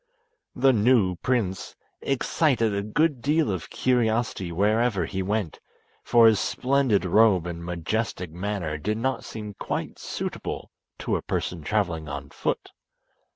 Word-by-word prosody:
The 135 +1 +4
new 105 -5 +3
prince 100 -7 -1 0.3
excited 130 -4 +1
a 100 - 0
good 135 +6 +1
deal 150 -4 +2
of 90 -4 -4
curiosity 115 -6 0
where 105 +6 +2
ever 105 -8 +1
he 95 +3 -3
went, 100 -3 -2 0.4
for 120 -1 +5
his 110 -2 +6
splendid 130 -8 +1
robe 95 -2 +4
and 85 -1 -5
majestic 90 +1 -3
manner 90 -3 -3
did 105 +7 -1
not 130 +2 -1
seem 105 -2 -7
quite - - -4
suitable - - -5 0.3
to - - -1
a - - -5
person 85 -2 -3
travelling 85 -4 -1
on 70 0 -6
foot. - - -3
105 Hz, 140 wpm, -25 LUFS, 90-120 Hz, 0.4 s, his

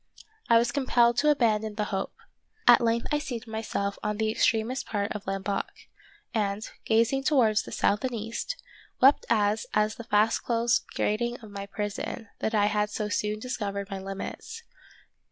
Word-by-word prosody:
I 230 - +7
was 235 +1 +2
compelled 240 -3 +3
to 300 - +4
abandon 220 -6 +2
the 210 - 0
hope. 195 0 -2 0.5
At - - +8
length 230 0 +1
I 295 - +2
seated 245 -5 -5
myself 220 -2 -3
on 210 0 -2
the 220 0 +1
extremest 225 +4 +1
part 205 -1 -2
of 205 -2 -6
Lamboc, 195 +1 -2 0.7
and, 210 -1 -1 0.2
gazing 230 +4 +2
towards 235 -7 +3
the - - -10
south 205 +4 +1
and 255 -2 -1
east, 230 - -4 0.4
wept 270 +3 +5
as 215 -1 +2
at 210 0 +3
the 235 - -8
fast 220 -1 +2
closed 235 0 +1
grating 240 +3 0
of 215 -2 -12
my 200 0 -6
prison, 205 +1 -4
that 220 - -1
I 205 -1 +4
had 210 0 +1
so 210 0 -3
soon 210 +1 -1
discovered 205 -4 -4
my 195 - -3
limits. 195 - -7
220 Hz, 170 wpm, -27 LUFS, 205-235 Hz, 0.7 s, At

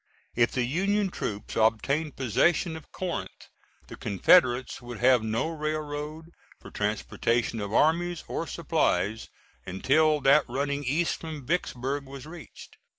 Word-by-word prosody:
If 120 0 +2
the 125 - +1
Union 195 +9 0
troops 105 -8 -5
obtained 135 +7 +1
possession 160 - +1
of 160 - -11
Corinth 185 -2 -5 0.4
the - - -10
Confederates 125 - +3
would 120 -1 -8
have 125 +1 +4
no 110 +7 -1
railroad 155 0 -4 0.3
for - - -12
transportation 115 +2 -1
of 100 0 -4
armies 170 +7 +2
or - - -3
supplies 110 +3 0 0.4
until 150 +11 +2
that 140 +3 +5
running 140 +3 -2
east 155 +6 0
from 155 -5 -7
Vicksburg 140 -3 -2
was 135 -1 -9
reached. 160 0 -12
140 Hz, 130 wpm, -27 LUFS, 120-160 Hz, 0.4 s, that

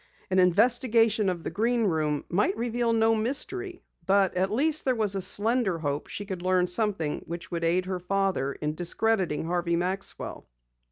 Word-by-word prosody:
An 185 - +3
investigation 225 +2 +3
of 175 -3 -4
the - - -4
Green 230 +3 0
Room 155 -6 -1
might 195 +3 0
reveal 235 0 -1
no 225 0 +3
mystery. 350 - -1 0.2
But 195 -1 +3
at 185 +1 +1
least 300 +7 +1
there 260 -2 +1
was 215 -3 +1
a 195 - -2
slender 205 0 +2
hope 145 -2 -3
she 205 - -6
could 190 -3 -6
learn 185 0 +2
something 180 -4 -1
which 170 +2 -7
would 170 -1 -3
aid 175 +2 +1
her 185 -1 -3
father 190 -6 -1
in 150 +1 -4
discrediting 175 -1 0
Harvey 170 0 -1
Maxwell. 185 +3 -4
195 Hz, 170 wpm, -27 LUFS, 175-225 Hz, 0.2 s, An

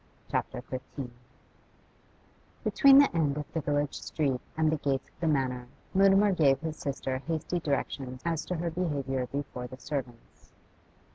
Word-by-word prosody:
CHAPTER 125 - -2
XV 130 0 -6 1.5
Between 275 -1 +7
the 280 -10 +6
end 150 -3 +2
of 150 - -3
the 160 - 0
village 145 0 -1
street 135 -5 -1 0.2
and 160 -1 +3
the 160 - +1
gates 140 -2 -1
of - - -33
the 170 - 0
Manor, 130 -4 0 0.3
Mutimer 195 +1 +5
gave 145 -7 +4
his 160 -1 -3
sister 135 -2 -3
hasty 165 +2 -1
directions 135 -4 -2
as 165 -2 0
to 180 - -2
her 170 0 -2
behaviour 140 -7 -1
before 135 -3 -4
the 130 - -10
servants. 130 -4 -7
145 Hz, 150 wpm, -29 LUFS, 135-165 Hz, 1.5 s, Between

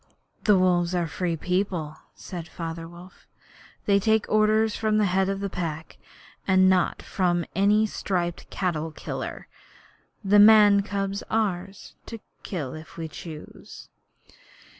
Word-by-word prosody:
'The 210 -3 +5
Wolves 180 -1 +2
are 175 - +1
a - - -3
free 170 +2 -2
people,' 180 -3 -2 0.2
said 175 -3 -8
Father 165 0 -6
Wolf. 175 +2 -15 0.6
'They 200 -1 +4
take 220 +1 +2
orders 215 0 +3
from 215 -1 0
the 210 - +3
Head 190 0 +1
of 195 0 -3
the 200 - -1
Pack, 160 -3 -5 0.5
and 185 -1 +5
not 185 -2 +1
from 175 -2 0
any 205 +2 +3
striped 175 -5 -3
cattle 165 -4 -2
dealer. 155 - -6 0.8
The 205 +1 +4
man's 205 -1 +7
cub 195 -1 -1
is 200 - -5
ours 195 -3 -2
to 230 - -7 0.2
kill 150 -9 -5
if 155 +2 -11
we 165 -1 -5
choose.' 155 0 -11
185 Hz, 140 wpm, -25 LUFS, 170-205 Hz, 0.8 s, man's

